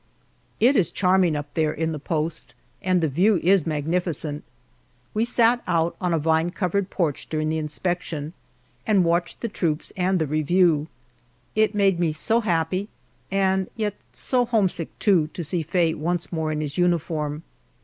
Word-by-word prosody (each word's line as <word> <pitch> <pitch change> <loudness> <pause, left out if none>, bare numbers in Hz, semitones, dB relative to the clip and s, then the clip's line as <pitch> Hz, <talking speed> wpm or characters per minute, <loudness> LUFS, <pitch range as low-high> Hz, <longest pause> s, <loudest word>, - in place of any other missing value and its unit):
It 255 +5 +5
is 195 -8 +3
charming 185 -3 +2
up 145 0 -5
there 155 -2 +1
in 160 +1 -2
the 155 - -4
post 155 +2 -3 0.3
and 185 -1 +2
the 160 - +2
view 185 +10 +3
is 185 -2 +4
magnificent. 155 -1 -2 0.7
We 220 +2 +1
sat 240 0 +3
out 165 0 +1
on 180 -1 0
a 165 - +2
vine 160 +2 +2
covered 185 +1 -1
porch 160 -7 -2
during 155 -1 -1
the 160 0 0
inspection, 155 0 -3 0.5
and 205 -4 +4
watched 170 0 0
the 235 - -1
troops 165 -7 -2
and 185 0 +1
the 160 - +1
review. 155 +1 +2 0.7
It 215 0 +2
made 195 -3 +3
me 165 -3 +1
so 225 +9 +1
happy, 185 +1 0 0.4
and 190 -1 +1
yet 210 -3 -1 0.2
so 250 -1 0
homesick, 195 -8 0
too, 180 -7 +3
to 175 - -3
see 165 +2 -1
Faye 165 +1 +1
once 170 +2 -2
more 160 -1 -1
in 155 0 -2
his 150 +1 -4
uniform. 160 -3 0
170 Hz, 165 wpm, -24 LUFS, 155-190 Hz, 0.7 s, It